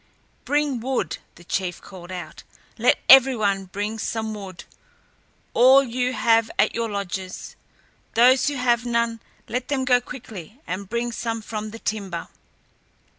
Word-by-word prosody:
"Bring 290 -3 +1
wood," 260 +2 -2 0.2
the 175 - -15
chief 180 0 -2
called 180 -2 -12
out; 180 -1 -7 0.4
"let - - +4
every 265 -1 +8
one 200 -3 0
bring 205 +4 -4
some 220 0 -3
wood; 195 -4 -8 0.9
all 260 +3 +7
you 250 0 -1
have 225 0 +3
at - - +3
your 230 0 -2
lodges. 190 -2 -5 0.6
Those 255 +4 +5
who 290 - 0
have 240 -2 +2
none, 235 -1 0 0.3
let 250 +1 -3
them 270 -2 -1
go 250 -1 +4
quickly 225 - -10
and 185 +1 -5
bring 235 +1 -1
some 230 -1 -3
from 215 0 -5
the 225 - -9
timber." 200 -6 -4
225 Hz, 145 wpm, -23 LUFS, 200-250 Hz, 0.9 s, every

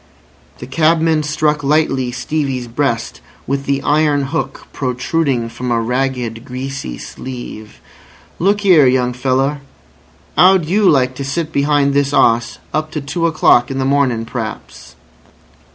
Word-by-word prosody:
The - - -8
cabman 160 +2 +2
struck 150 0 0
lightly 135 -4 +1
Stevie's 135 -1 -3
breast 120 -1 -2 0.2
with 140 +1 -2
the 140 0 -1
iron 150 -1 +2
hook 135 -1 -4
protruding 130 -1 -1
from 125 +2 -6
a 120 -1 +1
ragged, 125 -1 -2
greasy 130 - -6
sleeve. 120 -4 -9 0.6
"Look 200 +3 +1
'ere, 165 -8 +6
young 125 -1 +1
feller. 135 +3 0 0.8
'Ow'd 185 0 +6
you 195 +4 +3
like 130 -3 +2
to 140 - -4
sit 155 +4 -3
behind 140 -1 +2
this 140 0 +1
'oss 115 -2 +2 0.2
up 155 0 -1
to 150 - -2
two 165 +5 -1
o'clock 125 -6 +3
in 135 - -4
the 135 - 0
morning 135 -5 +1
p'raps?" 110 - -7
135 Hz, 135 wpm, -17 LUFS, 125-155 Hz, 0.8 s, ere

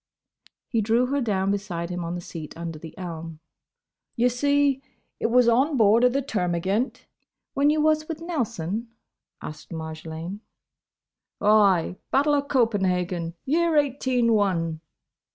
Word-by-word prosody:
He 230 -3 0
drew 230 +4 +2
her 280 +2 -1
down 195 -4 0
beside 180 -4 -3
him 180 0 -3
on 170 +1 -3
the 175 - -5
seat 160 -3 -8
under 165 -2 -6
the 160 0 -11
elm. 165 -3 -7 0.8
"Ye 245 +1 +3
see, 285 +2 +2 0.4
it - - +1
was 245 +1 +4
on 265 +5 +3
board 220 +1 +5
o' 250 - +6
the 275 +2 -1
Termagant—" 190 +1 -1 0.5
"When 280 +1 +3
you 305 0 +2
was 310 0 +2
with 325 -2 -5
Nelson?" 235 - -3 0.6
asked 150 - -8
Marjolaine. 160 +3 -6 1.0
"Ay. 200 -4 +4
Battle 290 +2 +3
o' 285 - +3
Copenhagen; 185 - 0
year 330 +2 +2
Eighteen 260 -4 +2
one." 165 -6 0
215 Hz, 135 wpm, -25 LUFS, 175-270 Hz, 1.0 s, o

